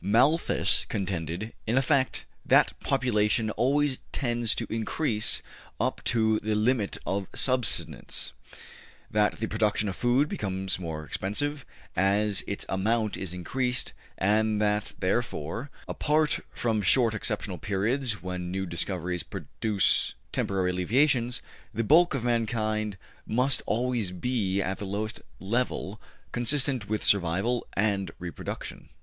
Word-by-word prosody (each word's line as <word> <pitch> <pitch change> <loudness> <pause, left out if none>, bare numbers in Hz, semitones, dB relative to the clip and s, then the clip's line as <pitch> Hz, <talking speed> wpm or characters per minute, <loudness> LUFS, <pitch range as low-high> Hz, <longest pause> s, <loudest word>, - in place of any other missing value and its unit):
Malthus 125 - +3
contended, 90 +2 -3
in 115 +4 +2
effect, 135 0 +2 0.2
that - - +5
population 110 -5 +1
always 140 +3 +2
tends 120 -3 0
to 120 - -1
increase 110 0 0 0.4
up - - -1
to 110 -2 +3
the 110 0 -1
limit 110 -1 +1
of 95 -1 -1
subsistence, 130 -3 0 0.8
that 105 0 +3
the 110 - 0
production 110 -1 +1
of 95 - -2
food 125 +7 +3
becomes 95 -6 -2
more 80 -3 -5
expensive 140 - -2 0.3
as 100 +2 +2
its 100 - -3
amount 110 +3 +1
is 95 -3 -4
increased, 125 +8 -1 0.2
and 105 +2 +2
that 105 0 +1
therefore, 95 - -1 0.2
apart 150 0 +1
from 110 -3 0
short 115 +3 +4
exceptional 105 - -2
periods 105 +3 -1
when 90 -1 -4
new 95 +1 -2
discoveries 90 0 -1
produce 105 -3 0 0.2
temporary 95 -2 0
alleviations, 120 - +2 0.3
the 115 - +1
bulk 160 +6 +5
of 130 - -2
mankind 110 -3 0 0.3
must 125 +4 +3
always 120 -4 0
be 100 -1 0
at 95 +1 -3
the 105 - -4
lowest 105 +3 -3 0.2
level 110 -1 -2 0.3
consistent 125 -2 +1
with 110 0 -1
survival 100 +6 +2
and 100 -2 +1
reproduction. 85 -1 -6
110 Hz, 120 wpm, -28 LUFS, 95-125 Hz, 0.8 s, that